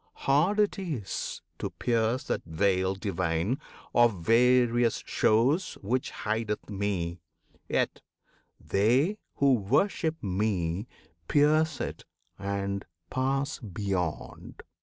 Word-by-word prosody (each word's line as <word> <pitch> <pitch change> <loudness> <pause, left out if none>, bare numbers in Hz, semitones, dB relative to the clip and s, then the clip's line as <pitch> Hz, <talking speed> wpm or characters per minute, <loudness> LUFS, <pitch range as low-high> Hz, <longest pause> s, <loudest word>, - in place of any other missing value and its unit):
Hard 160 +10 +3
it 210 -1 +2
is 150 - -4 0.2
To - - -2
pierce 115 +3 0
that - - -2
veil 95 +3 +1
divine 95 +3 -1 0.3
of 115 -8 +3
various 120 0 +4
shows 130 - +2
Which 125 +6 -2
hideth 110 -1 -3
Me; 95 -4 -2 0.5
yet - - 0 0.6
they 130 - +2 0.2
who 140 -1 +4
worship 145 - +1
Me 95 -1 -1 0.4
Pierce 155 +1 +3
it - - -5 0.3
and 100 0 -2 0.3
pass 135 +2 0
beyond. 95 - -4
110 Hz, 95 wpm, -28 LUFS, 95-135 Hz, 0.6 s, various